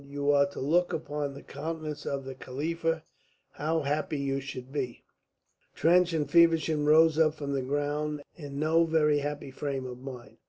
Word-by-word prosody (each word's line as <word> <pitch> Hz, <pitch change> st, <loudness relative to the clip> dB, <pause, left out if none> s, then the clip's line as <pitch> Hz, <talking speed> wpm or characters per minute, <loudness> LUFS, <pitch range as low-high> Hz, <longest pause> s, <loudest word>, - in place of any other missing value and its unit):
"You 145 Hz, 0 st, 0 dB
are 140 Hz, 0 st, +4 dB
to 140 Hz, -, -9 dB
look 170 Hz, +6 st, +2 dB
upon 145 Hz, -2 st, -3 dB
the -, -, -10 dB
countenance 155 Hz, 0 st, -5 dB
of 135 Hz, -1 st, -2 dB
the 135 Hz, -, -5 dB
Khalifa. 160 Hz, +5 st, -2 dB, 0.5 s
How 160 Hz, +2 st, -1 dB
happy 150 Hz, +1 st, -1 dB
you 135 Hz, -1 st, -1 dB
should 130 Hz, -1 st, -7 dB
be!" 130 Hz, -5 st, -4 dB, 0.7 s
Trench 180 Hz, +2 st, +4 dB
and 155 Hz, -3 st, 0 dB
Feversham 160 Hz, -1 st, +4 dB
rose 160 Hz, +1 st, +6 dB
up 155 Hz, -1 st, +4 dB
from 145 Hz, -2 st, -4 dB
the 135 Hz, -, 0 dB
ground 145 Hz, +2 st, -2 dB
in 145 Hz, -4 st, -8 dB
no 160 Hz, +3 st, +3 dB
very 155 Hz, -2 st, +3 dB
happy 145 Hz, -1 st, -4 dB
frame 135 Hz, -1 st, -3 dB
of 125 Hz, -1 st, -7 dB
mind. 125 Hz, -4 st, -9 dB
145 Hz, 170 wpm, -29 LUFS, 140-160 Hz, 0.7 s, rose